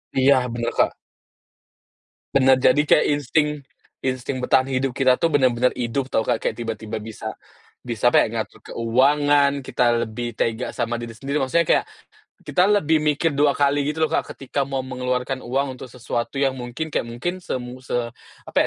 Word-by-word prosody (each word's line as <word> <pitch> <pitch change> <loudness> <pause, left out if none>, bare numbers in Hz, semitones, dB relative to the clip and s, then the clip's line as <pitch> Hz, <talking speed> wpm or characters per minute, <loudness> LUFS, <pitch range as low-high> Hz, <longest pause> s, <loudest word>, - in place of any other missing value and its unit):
Iya, 135 +1 +5 0.2
benar 120 0 -2
Kak. - - +5 1.5
Benar. 130 -1 +5
Jadi 130 +3 +4
kayak 150 - +4
insting 150 +1 +1 0.5
insting 130 0 -2
bertahan 130 +1 +3
hidup 135 0 0
kita 130 -1 +3
tuh, 165 - +1
benar-benar 125 -3 +3
hidup 125 +3 -2
tahu - - +2
Kak, - - +2
kayak, - - -1
tiba-tiba 110 -2 -4
bisa 110 -1 -6 0.5
bisa, 120 0 +1
apa - - +7
ya, - - -3
ngatur 110 -1 -5
keuangan, 140 +4 +2
kita 120 -2 +2
lebih 115 +1 -5
tega 115 +2 -1
sama 120 -1 -2
diri 115 -1 -7
sendiri. 140 +4 -2
Maksudnya 135 +6 +2
kayak, - - +3 0.6
kita 180 +2 +3
lebih 160 -6 +3
mikir 150 +2 +1
2 145 0 +3
kali, 145 0 +3
gitu 160 +1 0
loh - - -11
Kak, - - 0
ketika 140 +1 -2
mau 135 -1 -3
mengeluarkan 125 0 -2
uang 135 +2 -1
untuk 130 - -9
sesuatu 120 +1 -4
yang 135 -1 +2
mungkin 130 +5 -5
kayak - - +1
mungkin 175 +11 -4
semu 125 -4 -5
se 130 - -3 0.5
apa - - -13
130 Hz, 170 wpm, -22 LUFS, 120-145 Hz, 1.5 s, apa